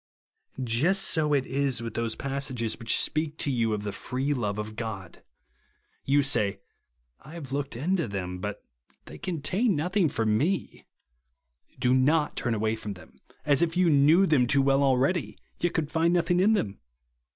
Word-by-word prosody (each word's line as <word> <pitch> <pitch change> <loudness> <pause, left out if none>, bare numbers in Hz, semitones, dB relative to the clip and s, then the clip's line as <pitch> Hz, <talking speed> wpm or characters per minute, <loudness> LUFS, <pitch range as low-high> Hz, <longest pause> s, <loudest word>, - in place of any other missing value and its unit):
Just 150 +12 +2
so 155 -2 +1
is 135 -1 0
it - - -7
with 115 -2 -5
those 115 -1 -2
passages 135 -5 -3
which 115 -2 +1
speak 155 0 -1
to 145 - -1
you 115 -3 0
of 105 -1 -2
the 105 - -3
free 130 +7 -2
love 105 -6 -2
of 105 0 -5
God. 105 -6 -6 0.8
You 140 +1 +3
say, 100 -8 0 0.6
I 150 - -13
have 145 -6 -8
looked 140 -1 -3
into 170 +5 0
them, 90 -3 -5
but 105 +1 -6
they - - -48
86 - - -53
THE - - -33
WORD - - -33
OF - - -46
THE 75 - -10 0.4
contain 230 -5 +3
nothing 180 +3 +1
for 115 -4 -2
me. 145 - -1 0.9
Do 125 0 +2
not 150 +4 +2
turn 120 -2 -1
away 110 +1 0
from 105 -2 -6
them, 90 - -16 0.3
as 145 0 +3
if 170 0 0
you 180 -2 +4
knew 150 +6 +5
them 140 -8 +3
too 140 +2 +3
well 135 0 +3
already, 135 - +1 0.2
yet 175 - -1
could 150 -2 -1
find 165 +2 +2
nothing 175 +1 +2
in 205 +4 +4
them. 100 - -2
135 Hz, 190 wpm, -27 LUFS, 110-160 Hz, 0.9 s, knew